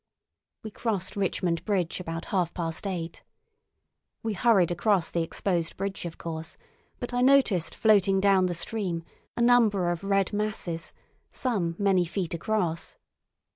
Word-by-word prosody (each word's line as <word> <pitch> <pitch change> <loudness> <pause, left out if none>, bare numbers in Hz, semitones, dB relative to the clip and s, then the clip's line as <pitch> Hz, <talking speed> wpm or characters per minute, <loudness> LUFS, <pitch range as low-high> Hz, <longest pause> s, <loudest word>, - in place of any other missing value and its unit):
We 220 - -6
crossed 200 -4 -2
Richmond 180 -3 -1
Bridge 190 -6 -1
about 165 -1 -5
half 180 -3 0
past 165 +2 -3
eight. 170 -3 -4 1.0
We 225 -1 -1
hurried 195 -4 +3
across 180 0 +1
the 170 - 0
exposed 170 0 -1
bridge, 195 -1 -4
of 170 - -6
course, 160 -1 -6 0.4
but 245 0 -5
I 245 - +1
noticed 255 - +4
floating 195 -3 +4
down 190 -1 +4
the 175 - -2
stream 175 -2 -3 0.3
a - - 0
number 215 -7 +4
of 175 +2 -4
red 195 0 +1
masses, 195 -6 -2 0.4
some 190 -10 -1
many 195 -3 +3
feet 175 0 -3
across. 170 -2 -2
190 Hz, 140 wpm, -27 LUFS, 170-210 Hz, 1.0 s, noticed